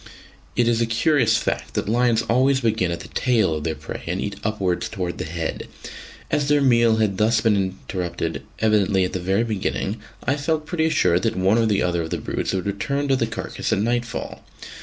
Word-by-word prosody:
It 120 - +2
is 120 -1 +2
a 115 - +2
curious 140 +6 +3
fact - - -3
that - - -1
lions 115 0 +2
always 130 +4 +2
begin 110 -6 +1
at 85 - -3
the - - -9
tail 115 -9 +2
of 75 -1 -3
their 80 0 -1
prey - - -7
and 90 +3 -1
eat 100 0 -3
upwards 105 0 -1
towards 90 -4 -4
the 90 - -4
head. 80 0 -4 0.6
As 145 -2 +1
their 145 0 +4
meal 120 -4 +4
had 105 -4 0
thus 110 +1 +3
been 110 -2 +3
interrupted 95 -2 -3 0.2
evidently 105 -3 +2
at 90 - -2
the 95 - -1
very 95 +5 +1
beginning, 105 -1 -2 0.3
I 140 +4 +1
felt 155 +1 -1
pretty 160 -1 0
sure 90 - +3
that - - -1
one 95 +5 +3
or 110 -3 +2
other 85 -1 0
of 80 - -4
the - - -2
brutes - - -3
would 95 -2 -2
return 140 +9 -2
to 135 - +4
the 115 -3 0
carcase 115 - -4
at - - +2
nightfall. 120 +3 -2
110 Hz, 205 wpm, -22 LUFS, 95-120 Hz, 0.6 s, their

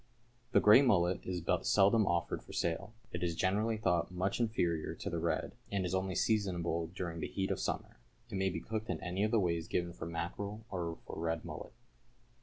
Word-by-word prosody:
= 120 0 -36
The - - +7
grey 105 +5 +8
mullet 90 -9 +3
is 90 -2 -2
but - - +1
seldom 100 +2 +5
offered 85 -1 0
for - - -12
sale. 90 +5 -1 0.2
It - - -3
is 85 -2 0
generally 105 +6 +1
thought 90 -5 +1
much 95 +4 -1
inferior 85 -9 0
to - - -5
the 85 - -1
red, 85 +1 0 0.2
and 100 -2 0
is 90 - -2
only 95 -1 0
seasonable 85 -6 +1
during 85 -2 -3
the - - -2
heat 95 0 -2
of 95 - -1
summer. - - -3 0.3
It 115 - -6
may 95 0 +2
be 85 -2 -4
cooked 110 0 -4
in 90 -4 -1
any 90 +3 -1
of 110 - +2
the 115 0 +3
ways 85 -3 0
given 85 -1 -1
for 80 - -6
mackerel 100 +6 -4
or 85 -3 -3
for - - -6
red 80 0 -1
mullet. - - -7
95 Hz, 210 wpm, -34 LUFS, 85-105 Hz, 0.3 s, grey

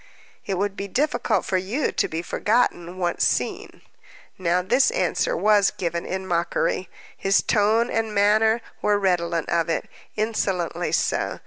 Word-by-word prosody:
"It 195 -2 -1
would 200 +1 -1
be 200 - -5
difficult 280 +10 0
for 190 - 0
you 210 +10 -1
to - - 0
be 165 +1 -4
forgotten, 185 -5 0
once 175 -2 -1
seen." - - -1 0.5
Now 180 0 0
this 250 - +3
answer - - 0
was 210 -2 +4
given 170 -1 -4
in 190 0 -3
mockery; 175 +1 -1 0.3
his 195 0 +2
tone 220 +3 +2
and 225 -1 -1
manner 215 +3 +3 0.2
were 210 0 +2
redolent 175 -4 0
of 170 0 +1
it, 165 - -1 0.3
insolently 200 -6 -1
so. - - 0
195 Hz, 145 wpm, -23 LUFS, 175-220 Hz, 0.5 s, was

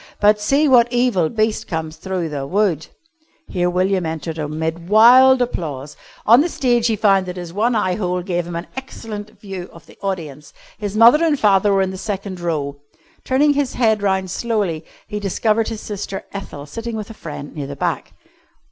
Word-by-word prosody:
But, 210 0 +4
see 280 +8 +2
what 245 -3 +5
evil 240 -10 +2
beast 220 -1 -1
comes 160 -2 -4
through 180 -1 -3
the 140 -2 -4
wood!" 180 -4 0 0.6
Here 180 -1 0
William 185 +1 +1
entered 160 0 -4
amid 160 +3 -4
wild 250 +4 +7
applause. 150 - -5 0.3
On 235 +5 +7
the 340 - 0
stage 240 -6 +1
he 225 - +1
found 195 -3 +3
that 180 0 -6
his 175 -2 -7
one 230 +5 +1
eye 185 -4 +1
hole 180 -2 -2
gave 175 -2 -2
him 175 - -6
an 170 +1 -4
excellent 220 -5 -8
view 190 -3 -7
of 170 - -15
the - - -19
audience. 155 -7 -5 0.3
His 205 -1 -4
mother 240 +8 +7
and 305 -4 +2
father 205 -1 +4
were 195 -1 +3
in 190 - -2
the 190 - -7
second 195 -2 -4
row. 150 -5 -2 0.5
Turning 290 +3 +3
his 285 -2 -1
head 220 -4 +2
round 190 -2 0
slowly 200 -8 -1 0.2
he 210 -1 -4
discovered 215 +3 0
his 225 -2 -5
sister 200 -2 -6
Ethel 170 -8 -7
sitting 230 +9 -6
with 215 0 -6
a - - -9
friend 145 -7 -8
near 145 -3 -4
the 140 - -6
back. - - -3
195 Hz, 190 wpm, -20 LUFS, 170-225 Hz, 0.6 s, wild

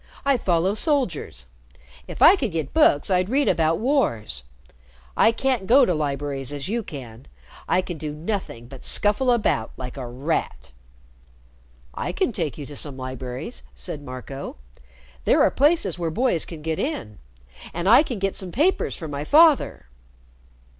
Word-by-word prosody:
I 280 -1 +4
follow 185 -4 +1
soldiers. 210 - 0 0.6
If - - -2
I 355 - +9
could 270 - -2
get 160 -4 -3
books, 145 +6 +4
I'd 185 +1 +2
read 275 +3 +2
about 160 0 +2
wars. 215 - 0 0.7
I - - +5
can't 235 -4 -1
go 265 +3 +6
to 180 - +1
libraries 140 -3 -2
as 145 +1 -4
you 230 +4 -1
can. 125 - -10 0.4
I 185 - +2
can 175 -4 -6
do 155 -2 -4
nothing 155 - -5
but 130 0 -12
scuffle 210 +5 +2
about 215 - +1
like 125 +1 -7
a 130 -2 -5
rat." 125 - -3 1.2
"I - - -4
can - - 0
take - - -3
you 145 - -6
to 145 - -10
some 140 -1 -2
libraries," 130 - -6
said 65 - -6
Marco. 135 +1 -7 0.7
"There - - +4
are - - +4
places 280 - +2
where 170 -1 -1
boys 215 -2 0
can 160 -3 -9
get 160 0 -2
in. 115 - -4 0.5
And 170 +2 -3
I 230 +7 +8
can 255 -7 -4
get 195 0 -1
some 185 -2 -5
papers 320 - +1
from 160 -4 -7
my 140 0 -4
father." 305 - +4
165 Hz, 160 wpm, -23 LUFS, -, 1.2 s, I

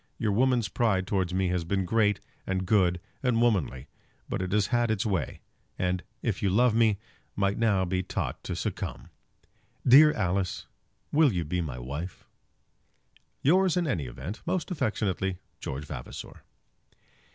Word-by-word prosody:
Your 110 - 0
woman's 120 +1 +2
pride 100 -3 +1
towards 95 -2 0
me 95 0 +1
has 90 -1 0
been 95 +3 -1
great 105 +1 +2 0.3
and 95 0 -1
good 90 -4 +3 0.2
and 125 -4 +2
womanly; 95 - +1 0.4
but - - -2
it 95 -1 -3
has 105 0 +3
had 120 -1 +3
its 110 -1 0
way; 95 - -2 0.4
and, 90 0 0 0.2
if 110 -6 -1
you 100 - +2
love 120 +5 +4
me, 110 -3 +3 0.4
might 100 +1 0
now 105 -5 +3
be 90 +1 0
taught - - -4
to - - -3
succumb. - - -4 0.8
Dear 150 +5 +9
Alice, 95 -3 -1 0.5
will 150 -2 +5
you 90 -4 -1
be 90 +4 -1
my 70 -7 -4
wife? 70 +8 -6 1.2
Yours, 185 +4 +4
in 175 - +2
any 90 - -1
event, 90 - -7
most 180 +1 -2
affectionately, 95 - -1 0.2
GEORGE 70 +3 -5
VAVASOR. - - -8
100 Hz, 150 wpm, -28 LUFS, 90-115 Hz, 1.2 s, Dear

